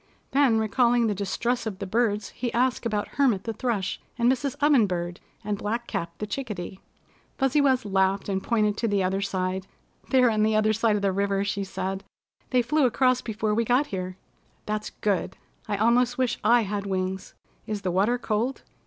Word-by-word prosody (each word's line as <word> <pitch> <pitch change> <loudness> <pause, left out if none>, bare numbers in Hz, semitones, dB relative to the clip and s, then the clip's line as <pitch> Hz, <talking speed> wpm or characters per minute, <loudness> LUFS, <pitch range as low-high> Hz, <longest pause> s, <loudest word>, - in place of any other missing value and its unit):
Then 270 -5 +4
recalling 235 +2 +3
the 215 - +1
distress 225 +5 -1
of 200 -4 -4
the 200 - -5
birds, 210 +1 0
he 240 -1 -4
asked 250 0 +1
about 210 -2 -1
Hermit 245 -9 +1
the 225 - -3
Thrush 220 -5 -2 0.2
and 240 +1 +4
Mrs. 265 +1 -1
Oven 285 -7 +4
Bird 175 -1 -3 0.2
and 205 -1 -2
Black 230 +3 -2
Cap 170 -7 -3
the 210 - -3
Chickadee. 205 -5 -5 0.6
Fuzzy 270 +2 +2
Wuzz 260 -4 +2
laughed 195 0 +1
and 190 -1 -1
pointed 210 -2 +1
to 230 - 0
the 200 -2 +1
other 190 +1 0
side. 190 -1 -2 0.4
"They're 255 -3 +5
on 215 -1 +1
the 215 0 +3
other 215 0 +3
side 225 0 +2
of 205 - -2
the 195 - +3
river," 200 +1 0
she 200 0 -2
said. 190 0 -4 0.5
"They 250 -1 +3
flew 275 +3 +3
across 255 +1 +2
before 215 -1 -2
we 230 +2 +2
got 245 +5 +2
here." 185 -1 -4 0.5
"That's 215 0 -3
good. 200 -4 -2 0.3
I 205 -1 -1
almost 240 +3 +3
wish 255 -3 0
I 240 0 +5
had 200 -1 -3
wings. 190 0 -3 0.3
Is 210 -2 -3
the 185 - 0
water 205 +7 +2
cold?" 235 +3 -2
215 Hz, 190 wpm, -26 LUFS, 195-245 Hz, 0.6 s, They're